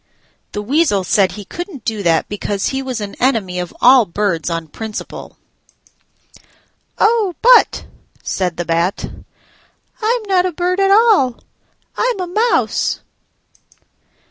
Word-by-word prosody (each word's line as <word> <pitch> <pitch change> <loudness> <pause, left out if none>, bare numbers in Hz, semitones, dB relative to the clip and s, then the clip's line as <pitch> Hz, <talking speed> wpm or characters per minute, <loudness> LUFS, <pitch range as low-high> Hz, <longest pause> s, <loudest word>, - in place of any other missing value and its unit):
The 205 - -4
Weasel 265 - +1
said 190 -1 +2
he 205 0 -9
couldn't 345 - -8
do 220 -2 -2
that 165 -3 +1
because 205 -1 -2
he 265 0 -2
was 260 -3 -4
an 200 -1 -5
enemy 215 -8 0
of 180 -1 -4
all 250 -3 +6
birds 180 -3 -1
on 165 -1 -3
principle. 220 +7 -8 1.6
"Oh, 425 -5 +2
but," - - +5 0.4
said 180 -3 -2
the 175 - -3
Bat, 170 +3 -1 0.9
"I'm 460 +3 +1
not 375 -3 +2
a - - -3
bird 360 +3 -1
at 390 0 +3
all: 400 - +3 0.5
I'm 485 -4 0
a 365 - -2
mouse." 435 +7 0
245 Hz, 130 wpm, -17 LUFS, -, 1.6 s, all